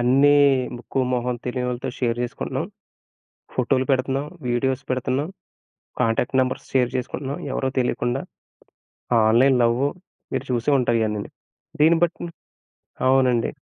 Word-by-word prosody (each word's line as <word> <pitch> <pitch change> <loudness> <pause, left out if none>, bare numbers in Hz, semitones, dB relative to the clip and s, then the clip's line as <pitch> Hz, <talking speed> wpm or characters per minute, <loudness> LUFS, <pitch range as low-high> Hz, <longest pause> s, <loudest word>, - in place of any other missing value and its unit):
అన్నీ 135 +4 +5 0.4
ముక్కు, 120 +2 -5
మొహం 125 0 -1
తెలియనోళ్ళతో 125 0 -2
షేర్ 120 -2 0
జేసుకుంటున్నాం. 120 - -3 0.9
ఫోటో‌లు 130 +1 +1
పెడుతున్నాం. 135 +2 0 0.2
వీడియోస్ 130 +2 0
పెడుతున్నాం. 130 +4 -1 0.7
కాంటాక్ట్ 115 +3 +1
నంబర్స్ 130 0 -1
షేర్ 125 -2 +3
జేసుకుంటున్నాం 130 +2 -3 0.2
ఎవరో 130 - 0
తెలియకుండా. 120 +1 0 1.1
ఆన్‌లైన్ 125 +3 +5
లవ్వు 120 +4 +2 0.5
మీరు 130 +1 -2
చూసే 120 +4 +1
ఉంటారు 120 -2 +2
ఇయనిన్ని. 105 -1 -3 0.5
దీన్ని 165 +2 +5
బట్టి 175 0 -1 0.8
అవునండి. 130 -3 +3
130 Hz, 110 wpm, -23 LUFS, 120-135 Hz, 1.1 s, అన్నీ